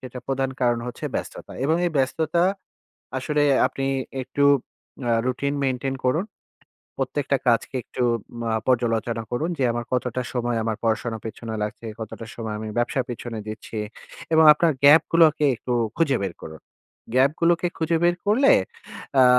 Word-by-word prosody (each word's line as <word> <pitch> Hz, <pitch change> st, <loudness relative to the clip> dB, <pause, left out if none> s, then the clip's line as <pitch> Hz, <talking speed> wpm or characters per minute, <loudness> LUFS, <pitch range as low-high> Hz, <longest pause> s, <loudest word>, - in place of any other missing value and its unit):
সেটা 130 Hz, 0 st, -8 dB
প্রধান 135 Hz, 0 st, 0 dB
কারণ 120 Hz, -1 st, +3 dB
হচ্ছে 125 Hz, -, -7 dB
ব্যস্ততা -, -, -5 dB
এবং 160 Hz, +3 st, +3 dB
এই 170 Hz, -, -2 dB
ব্যস্ততা 160 Hz, +6 st, +1 dB, 0.7 s
আসলে 150 Hz, +3 st, 0 dB, 0.2 s
আপনি 135 Hz, -, -3 dB, 0.4 s
একটু 140 Hz, +3 st, 0 dB, 0.6 s
আ 115 Hz, -, +3 dB
রুটিন 140 Hz, +3 st, -1 dB
মেইনটেইন 135 Hz, 0 st, -1 dB
করুন। 155 Hz, +9 st, +2 dB, 0.7 s
প্রত্যেকটা 140 Hz, -1 st, 0 dB
কাজকে 120 Hz, +3 st, +1 dB
একটু 125 Hz, -, -3 dB, 0.4 s
মা 115 Hz, -1 st, -1 dB, 0.2 s
পর্যালোচনা 115 Hz, -2 st, +1 dB
করুন 150 Hz, +8 st, -1 dB
যে -, -, +2 dB
আমার 120 Hz, 0 st, -3 dB
কতটা 125 Hz, 0 st, -1 dB
সময় 120 Hz, -1 st, -1 dB
আমার 110 Hz, -1 st, -2 dB
পড়াশোনা 115 Hz, 0 st, 0 dB
পেছনে 110 Hz, 0 st, -6 dB
লাগছে, 105 Hz, +2 st, -6 dB, 0.2 s
কতটা 110 Hz, +1 st, -7 dB
সময় 110 Hz, -2 st, -4 dB
আমি 110 Hz, -, -5 dB
ব্যবসার 120 Hz, +2 st, +1 dB
পেছনে 120 Hz, -1 st, -5 dB
দিচ্ছি 110 Hz, +1 st, -7 dB, 0.6 s
এবং 160 Hz, 0 st, +6 dB
আপনার 165 Hz, +2 st, +2 dB
গ্যাপগুলোকে 155 Hz, +1 st, +6 dB
একটু 125 Hz, +2 st, -4 dB, 0.2 s
খুঁজে 145 Hz, -6 st, +2 dB
বের 95 Hz, -3 st, -3 dB
করুন। 80 Hz, -1 st, -9 dB, 0.5 s
গ্যাপগুলোকে 165 Hz, +6 st, +3 dB
খুঁজে 165 Hz, 0 st, +1 dB
বের 175 Hz, 0 st, +4 dB
করলে 235 Hz, +7 st, +5 dB, 0.6 s
অ্যা 130 Hz, -1 st, +7 dB
130 Hz, 145 wpm, -24 LUFS, 115-150 Hz, 0.7 s, অ্যা